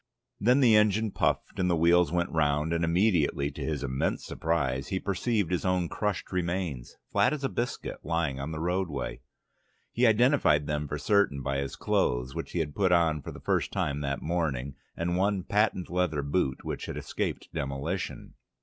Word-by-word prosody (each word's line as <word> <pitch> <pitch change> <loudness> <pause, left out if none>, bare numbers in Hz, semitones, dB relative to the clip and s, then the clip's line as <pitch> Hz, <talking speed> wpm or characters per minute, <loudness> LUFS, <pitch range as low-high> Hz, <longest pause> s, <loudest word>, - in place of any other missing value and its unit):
Then 125 +6 +4
the 115 -4 +6
engine 105 0 +3
puffed - - -1
and 90 -1 +2
the 85 - +3
wheels 85 0 +4
went 85 +1 0
round, 75 0 +1
and 85 0 0
immediately, 85 -5 +2
to - - -9
his 75 -3 -2
immense 65 0 -1
surprise, 70 -5 -1
he 95 - -1
perceived 100 -1 -1
his 90 - 0
own 90 -2 +1
crushed 105 -3 -2
remains, 85 -8 -2 0.2
flat - - +3
as 145 -2 -4
a 135 - +1
biscuit, 120 0 -3
lying 80 -5 -1
on 70 +4 -4
the 80 - -4
roadway. 85 -7 -2 0.7
He 120 +1 +3
identified 110 - +4
them 75 0 -2
for 75 - -3
certain 75 -4 +2
by 70 +1 -1
his 70 -1 -4
clothes, 60 +2 0
which - - -6
he 85 - 0
had 75 -2 -4
put 95 -3 +2
on 80 -3 +3
for - - -7
the - - -10
first - - 0
time 70 +1 -1
that 70 -1 -3
morning, 75 -6 -1 0.2
and 85 +1 -1
one 100 0 +1
patent 100 -2 +1
leather 90 -5 0
boot 70 -2 -1
which - - -4
had - - -5
escaped - - -3
demolition. 70 +7 -4
85 Hz, 185 wpm, -28 LUFS, 70-95 Hz, 0.7 s, the